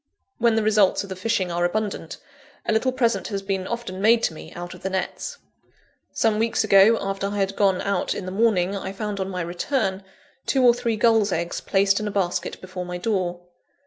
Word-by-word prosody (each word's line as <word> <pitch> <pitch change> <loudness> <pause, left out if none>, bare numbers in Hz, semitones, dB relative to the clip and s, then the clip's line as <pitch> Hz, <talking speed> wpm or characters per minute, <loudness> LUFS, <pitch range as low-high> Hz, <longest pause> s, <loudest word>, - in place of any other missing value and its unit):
When 235 -1 +3
the 225 - +2
results 210 -2 +3
of 200 - -10
the 190 - -4
fishing 185 -2 -1
are 175 +1 0
abundant, 205 +3 -2 0.5
a - - +1
little 230 +4 +2
present 240 -3 0
has 200 -3 -4
been 195 -1 -2
often 235 -6 -5
made 230 +2 +4
to - - +1
me, - - -11
out 175 0 -7
of - - -13
the 190 - -2
nets. 190 - -3 0.7
Some 220 -2 +1
weeks 225 0 +1
ago, 205 +2 +6
after 195 0 -2
I 205 +1 -4
had 195 0 0
gone 195 -3 +2
out 200 0 -1
in 195 - -5
the 185 - -5
morning, 195 -3 +2
I 190 -1 -5
found 205 0 -4
on 190 0 -2
my 180 -1 -3
return, 190 +3 -2 0.4
two 265 -2 +3
or 240 - +7
three 235 -2 -1
gulls' 220 -2 +3
eggs 170 0 -2
placed 195 +1 +2
in 215 - -3
a - - -1
basket 195 -3 -2
before 185 -1 -6
my 180 0 -5
door. 180 -3 -1
200 Hz, 210 wpm, -23 LUFS, 185-225 Hz, 0.7 s, or